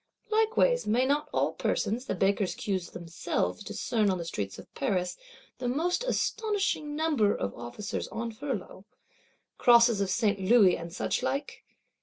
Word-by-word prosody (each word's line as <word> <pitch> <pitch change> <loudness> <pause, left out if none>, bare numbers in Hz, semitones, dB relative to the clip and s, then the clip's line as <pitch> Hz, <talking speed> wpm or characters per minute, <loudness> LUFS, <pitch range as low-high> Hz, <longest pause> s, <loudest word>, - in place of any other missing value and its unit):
Likewise, 445 - +2
may 240 +5 +3
not 290 +2 0
all - - +1
persons, 240 +5 -1
the - - -1
Bakers' 195 +1 +1
queues 190 -4 -3
themselves 170 -1 -3
discern 215 -4 0
on 185 - +1
the 170 - -5
streets 100 - -4
of - - -13
Paris, 185 -9 -1 0.4
the 250 - -2
most 335 - 0
astonishing 410 -11 -1
number 295 -10 +2
of 100 - -3
Officers 120 - -5
on 230 +1 -4
furlough, 220 -6 -5 0.8
Crosses 235 -3 +6
of 195 - 0
St. 205 0 +1
Louis, 195 -1 +5
and 170 0 -7
such 180 - -1
like? 275 +1 -3
225 Hz, 150 wpm, -29 LUFS, 190-285 Hz, 0.8 s, Crosses